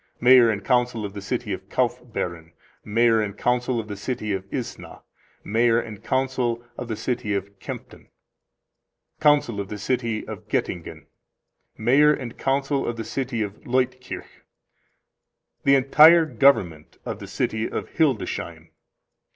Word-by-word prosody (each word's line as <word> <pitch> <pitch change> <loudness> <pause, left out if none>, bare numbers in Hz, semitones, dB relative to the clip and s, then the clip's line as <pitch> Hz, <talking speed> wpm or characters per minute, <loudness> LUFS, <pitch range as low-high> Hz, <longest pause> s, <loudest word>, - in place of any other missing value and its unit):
Mayor 125 -1 +7
and 105 -3 -2
Council 125 -3 +1
of 100 - -7
the 100 - -7
City 100 - -3
of - - -8
Kaufbeuren. 85 -2 -3 0.3
Mayor 115 +1 +3
and 105 -1 -4
Council 125 0 0
of 110 - -5
the 105 - -5
City 105 0 -3
of 95 0 -5
Isna. 125 -4 -6 0.4
Mayor 115 +2 +2
and 110 -4 -8
Council 130 -3 -1
of 125 - -6
the 110 - -3
City 110 -1 -2
of 100 0 -5
Kempten. - - -9 1.1
Council 145 -8 +3
of 100 -1 -4
the 105 - -5
City 115 +1 -2
of - - -8
Goettingen. 85 -2 -3 0.7
Mayor 135 +7 +5
and 125 -6 -4
Council 135 +1 0
of 120 - -3
the 115 - -3
City 125 -4 -2
of 105 0 -8
Leutkirch. 125 0 -2 1.2
The 140 - +6
entire 155 +5 +7
Government 95 - +2
of - - -5
the - - -8
City 110 +1 -2
of - - -5
Hildesheim. 140 -9 -1
120 Hz, 145 wpm, -24 LUFS, 105-130 Hz, 1.2 s, Mayor